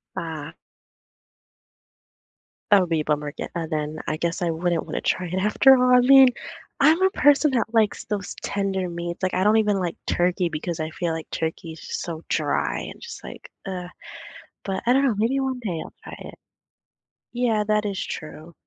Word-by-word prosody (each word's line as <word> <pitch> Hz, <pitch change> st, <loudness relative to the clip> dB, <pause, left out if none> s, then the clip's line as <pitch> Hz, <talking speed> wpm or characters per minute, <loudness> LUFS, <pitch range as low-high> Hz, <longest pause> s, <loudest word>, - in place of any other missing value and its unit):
Ah. 160 Hz, -4 st, -6 dB, 2.2 s
That 200 Hz, -, +8 dB
would 175 Hz, -, -2 dB
be 160 Hz, -2 st, +1 dB
a -, -, -7 dB
bummer 150 Hz, -1 st, -1 dB
ge -, -, -11 dB
uh, 165 Hz, -2 st, -2 dB
then, 155 Hz, 0 st, -3 dB
I 155 Hz, -, -1 dB
guess 170 Hz, +2 st, -2 dB
I 170 Hz, -, +1 dB
wouldn't 165 Hz, 0 st, -1 dB
wanna -, -, -4 dB
try 180 Hz, -1 st, -1 dB
it 185 Hz, +3 st, -3 dB
after 265 Hz, +7 st, +5 dB
all, 250 Hz, 0 st, +4 dB
I -, -, +6 dB
mean, 265 Hz, 0 st, +8 dB, 0.5 s
I'm 315 Hz, +6 st, +5 dB
a 380 Hz, -, +5 dB
person 290 Hz, +1 st, +4 dB
that 230 Hz, -2 st, -1 dB
likes 220 Hz, -2 st, +1 dB
those 205 Hz, -3 st, -4 dB
tender 190 Hz, -2 st, -2 dB
meats, 170 Hz, +1 st, -5 dB
like, 185 Hz, -, 0 dB
I 185 Hz, -, +1 dB
don't 215 Hz, +2 st, +4 dB
even 210 Hz, -2 st, +2 dB
like 175 Hz, -2 st, -2 dB
turkey 175 Hz, 0 st, +1 dB
because 160 Hz, +1 st, -4 dB
I 155 Hz, 0 st, -2 dB
feel 170 Hz, 0 st, -3 dB
like 160 Hz, -1 st, -6 dB
turkey's 160 Hz, 0 st, -4 dB, 0.2 s
so 165 Hz, -1 st, -6 dB
dry -, -, 0 dB
and -, -, -8 dB
just 450 Hz, -3 st, -9 dB
like, -, -, -10 dB, 0.2 s
ugh, 180 Hz, -2 st, -5 dB, 0.8 s
but 195 Hz, -1 st, -3 dB
I 245 Hz, -, +5 dB
don't 275 Hz, +1 st, +3 dB
know, 245 Hz, -6 st, +2 dB
maybe 235 Hz, +6 st, +1 dB
one 265 Hz, -1 st, -2 dB
day 180 Hz, -8 st, -3 dB
I'll -, -, -11 dB
try -, -, -8 dB
it. -, -, -11 dB, 1.0 s
Yeah, 235 Hz, -3 st, +1 dB
that 210 Hz, 0 st, +1 dB
is 200 Hz, -2 st, -2 dB
true. 155 Hz, +1 st, -8 dB
185 Hz, 190 wpm, -24 LUFS, 165-230 Hz, 2.2 s, That